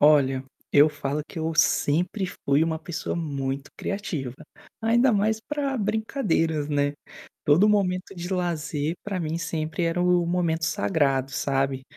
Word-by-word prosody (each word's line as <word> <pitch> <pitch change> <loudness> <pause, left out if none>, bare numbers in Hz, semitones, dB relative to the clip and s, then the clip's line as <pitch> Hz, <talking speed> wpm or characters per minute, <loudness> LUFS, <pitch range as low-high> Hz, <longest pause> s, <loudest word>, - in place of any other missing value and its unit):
Olha, 135 -3 +4 0.3
eu 145 +2 +7
falo 150 0 -3
que 165 - -7
eu 160 0 -1
sempre 170 +5 +2
fui 150 -3 +1
uma 160 -1 -1
pessoa 170 +1 -4
muito 140 -4 -3
criativa, 175 - -3 0.5
ainda 235 +2 +4
mais 215 +2 +2
para 280 +1 -2
brincadeiras, 205 - 0
né. 145 -1 +1 0.5
Todo 170 +9 +5
momento 190 -2 +1
de 175 +1 -5
lazer 165 -3 -1
para 200 -3 -2
mim 160 0 -2
sempre 160 +1 -3
era 165 +1 0
o 180 -1 +3
momento 170 -2 0
sagrado, 140 -5 +1
sabe? 135 -1 0
165 Hz, 140 wpm, -25 LUFS, 145-190 Hz, 0.5 s, eu